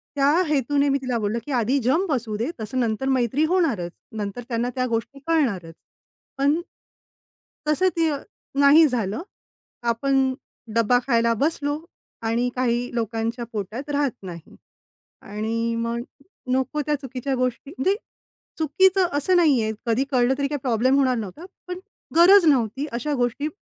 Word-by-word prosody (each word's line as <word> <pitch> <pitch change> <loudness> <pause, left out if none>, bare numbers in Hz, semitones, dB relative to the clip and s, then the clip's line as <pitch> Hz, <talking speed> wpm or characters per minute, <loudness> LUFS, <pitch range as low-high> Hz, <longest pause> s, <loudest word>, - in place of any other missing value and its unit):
त्या 280 +1 +4 0.2
हेतूने 285 0 +1
मी 275 - +2
तिला 250 -2 -1
बोललं, 215 +2 -1
की 295 - -6
आधी 245 +2 +1
जम 315 - +2
बसवू 235 -6 -1
देतसं 235 -1 -3
नंतर 235 +3 0
मैत्री 260 +3 +1
होणारच. 305 - +1 0.3
नंतर 205 +3 -4
त्यांना 235 +1 -1
त्या 255 -1 0
गोष्टी 230 +4 -3
कळणारच. 225 - 0 0.6
पण 285 +4 +2 1.1
तसं 370 +5 +3
ते 325 -1 +3 0.5
नाही 290 +3 +7
झालं. 225 - -2 0.7
आपण 265 +2 +2 0.4
डब्बा 230 +2 +4
खायला 235 -2 +3
बसलो 295 -1 0 0.5
आणि 240 +2 +1
काही 245 -1 0
लोकांच्या 230 +1 -2
पोटात 220 +8 -5
राहत 285 -3 +1
नाही 170 -3 -9 0.7
आणि 225 +3 -2
मग 230 +1 -2 0.5
नको 265 +4 0
त्या 300 0 +1
चुकीच्या 265 0 -3
गोष्टी, 255 +2 -2
म्हणजे 380 +10 +2 0.6
चुकीचं 375 +5 +3
असं 365 +6 +2
नाही 295 -9 +4
आहे, 220 - -1
कधी 230 +3 +2
कळलं 250 0 +3
तरी 280 - 0
काही 290 0 -3
प्रॉब्लेम 255 +1 +2
होणार 260 -2 +3
नव्हता 225 - -6 0.2
पण 360 0 -5 0.4
गरज 365 +2 +7
नव्हती 265 -2 +2
अशा 295 +5 -2
गोष्टी 245 +4 0
255 Hz, 140 wpm, -23 LUFS, 230-290 Hz, 1.1 s, नाही